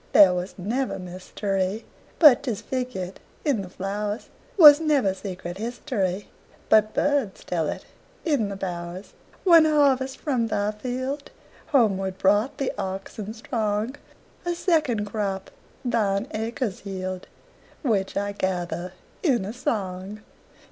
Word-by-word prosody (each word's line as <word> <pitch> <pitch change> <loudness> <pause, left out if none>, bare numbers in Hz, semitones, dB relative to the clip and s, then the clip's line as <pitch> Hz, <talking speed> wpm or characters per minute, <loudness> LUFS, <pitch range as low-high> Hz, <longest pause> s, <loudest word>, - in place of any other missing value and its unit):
There 190 -3 +8
was 180 +1 -4
never 235 +8 -1
mysteryBut 195 - +1
'tis 235 -7 -2
figured 245 -8 -4 0.3
in 275 -9 +2
the 185 - -8
flowers; 205 +3 -4 0.3
SWas 300 -4 +10
never 290 -11 +2
secret 185 -2 -6
historyBut 215 -1 -1
birds 285 -9 +1
tell 165 -4 -1
it - - -5 0.4
in 280 -11 +1
the 200 - -4
bowers. 180 0 -6 0.3
One 335 -4 +7
harvest 275 -4 +3
from 250 -6 0
thy 210 -1 0
fieldHomeward 245 -4 -2
brought 205 +7 +2
the 275 - -1
oxen 195 +2 -5
strong;A 225 - -4
second 300 - +1
crop 200 -2 -3 0.3
thine 215 -2 +1
acres 225 -1 -3
yield, 185 -2 -5 0.6
Which 205 -8 0
I 205 0 -1
gather 180 -2 -2 0.3
in 250 - +2
a 210 - -5
song. 205 -4 -3
210 Hz, 115 wpm, -25 LUFS, 190-255 Hz, 0.6 s, SWas